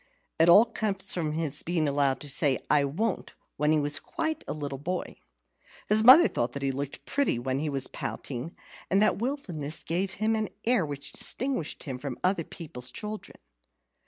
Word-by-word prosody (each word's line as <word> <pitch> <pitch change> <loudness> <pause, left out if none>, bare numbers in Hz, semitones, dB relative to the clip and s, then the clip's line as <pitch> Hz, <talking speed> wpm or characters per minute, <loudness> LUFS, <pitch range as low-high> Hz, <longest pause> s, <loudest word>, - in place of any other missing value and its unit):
It 165 +1 +6
all 205 +6 +8
came 220 -3 -2
of 180 -5 -2
his 160 -4 0
being 165 -3 0
allowed 140 -2 +1
to 145 - -6
say 140 -1 +3
"I 145 -1 +4
won't" 190 +12 -3 0.2
when 150 +1 +2
he 155 - +3
was 145 0 0
quite 315 -1 -3
a - - -3
little 145 -3 -5
boy. 180 +5 -4 0.7
His 215 +1 +5
mother 270 +9 +9
thought 120 +3 -2
he 135 -1 -1
looked 140 +1 -6
pretty 280 - +1
when 130 +2 -2
he 150 +1 -2
was 135 -2 0
pouting, 135 +5 -5 0.3
and 195 - +3
that 215 - +2
wilfulness 180 - -3
gave 185 +3 -1
him 220 +2 0
an 220 -1 -1 0.2
air 230 -9 +2
which 140 -1 -5
distinguished 255 - -1
him 130 -4 -5
from 135 -2 -5
other 185 -2 +2
people's 125 -7 -4
children. 210 - -7
155 Hz, 180 wpm, -28 LUFS, 140-210 Hz, 0.7 s, mother